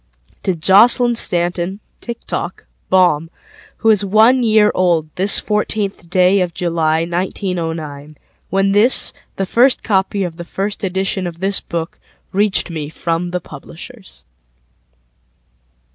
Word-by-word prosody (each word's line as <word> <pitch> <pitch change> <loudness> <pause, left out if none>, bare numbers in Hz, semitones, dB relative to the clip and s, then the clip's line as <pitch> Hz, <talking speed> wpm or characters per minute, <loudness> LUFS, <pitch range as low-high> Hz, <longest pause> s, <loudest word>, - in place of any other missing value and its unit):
ToJoslyn 205 +7 +5
Stanton 175 -1 -1 0.2
(Tik 235 -1 -8
Tok) 175 - -5 0.2
Baum, 175 -4 +2 0.5
Who 225 - +3
is 210 -2 +2
one 220 +6 +4
year 215 -2 +3
old 170 -4 +1
this 195 +2 +5
14th 210 -4 -3
day 185 +2 +3
of 175 -2 -3
July, 165 -2 0
1909When 170 0 -4
this, 220 +5 +4 0.2
the 195 - -2
first 245 +7 +2
copy 195 -1 0
of 170 -3 -6
the 175 - -7
first 195 +4 -4
editionOf 190 -2 -3
this 195 +2 +1
book, 165 -1 -6 0.3
reached 200 -2 0
me 155 -3 -5
from 165 +2 -3
the 180 0 -3
publishers. 140 - -12
185 Hz, 115 wpm, -17 LUFS, 170-205 Hz, 0.5 s, ToJoslyn